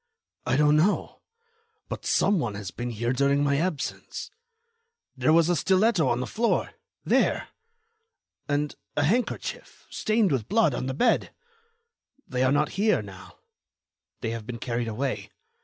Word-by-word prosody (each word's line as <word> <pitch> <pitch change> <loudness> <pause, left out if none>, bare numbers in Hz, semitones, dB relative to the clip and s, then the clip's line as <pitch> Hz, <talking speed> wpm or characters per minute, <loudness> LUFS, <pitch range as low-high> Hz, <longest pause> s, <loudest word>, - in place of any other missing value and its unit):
"I 130 - +2
don't 150 0 +5
know, 185 +7 +1 0.7
but - - -6
some 200 -2 +3
one 120 -8 -2
has 100 -3 -6
been 120 +1 -4
here 120 +2 -1
during 140 +2 +2
my 140 -1 +2
absence. 160 -2 -3 0.8
There 155 - +2
was 165 0 +5
a 175 - +2
stiletto 190 +3 +3
on 120 +1 0
the - - -2
floor—there! 230 - -1 1.0
And 145 0 0 0.2
a 145 - +3
handkerchief, 225 +10 -2
stained 215 -4 +1
with 125 -6 -1
blood, 210 - +3
on 130 - -3
the 130 - -3
bed. 245 - +1 0.9
They 125 -1 -2
are 130 0 +3
not 145 +1 +2
here 215 0 +3
now. - - -12 0.8
They 115 - -2
have 115 -2 -6
been 120 - -5
carried 120 0 -2
away. 125 +4 -3
145 Hz, 145 wpm, -26 LUFS, 125-180 Hz, 1.0 s, don't